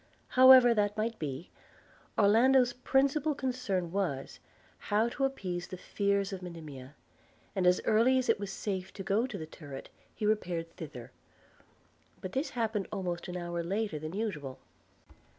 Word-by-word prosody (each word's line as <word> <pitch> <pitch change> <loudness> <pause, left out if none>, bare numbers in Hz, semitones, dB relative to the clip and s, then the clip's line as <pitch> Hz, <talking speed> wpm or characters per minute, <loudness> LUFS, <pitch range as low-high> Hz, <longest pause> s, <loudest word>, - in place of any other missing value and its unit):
However 255 -2 +8
that 205 -1 0
might 225 +1 -2
be, 145 +2 -5 0.7
Orlando's 245 +4 +5
principal 275 +4 +1
concern 245 -11 -2
was, 170 -9 -2 0.5
how 215 +3 +3
to 270 +3 -1
appease 180 -10 -3
the 185 - -7
fears 200 +1 -1
of 190 - -5
Monimia; 150 -6 -9 0.6
and 185 -2 +2
as 180 0 +5
early 235 +4 +4
as 255 - 0
it - - +3
was 200 -1 -4
safe 190 -2 -4
to 195 - -7
go 205 +6 +1
to 230 -6 -6
the 160 - -6
turret, 145 -4 -10 0.3
he 215 - -3
repaired 175 -6 -1
thither; 130 -7 -9 1.1
but 185 - -6
this 270 - -1
happened 220 -4 -1
almost 180 -4 -3
an 180 0 -5
hour 175 -1 -3
later 195 -1 -2
than 155 +2 -6
usual. 175 -11 -4
200 Hz, 150 wpm, -31 LUFS, 175-230 Hz, 1.1 s, However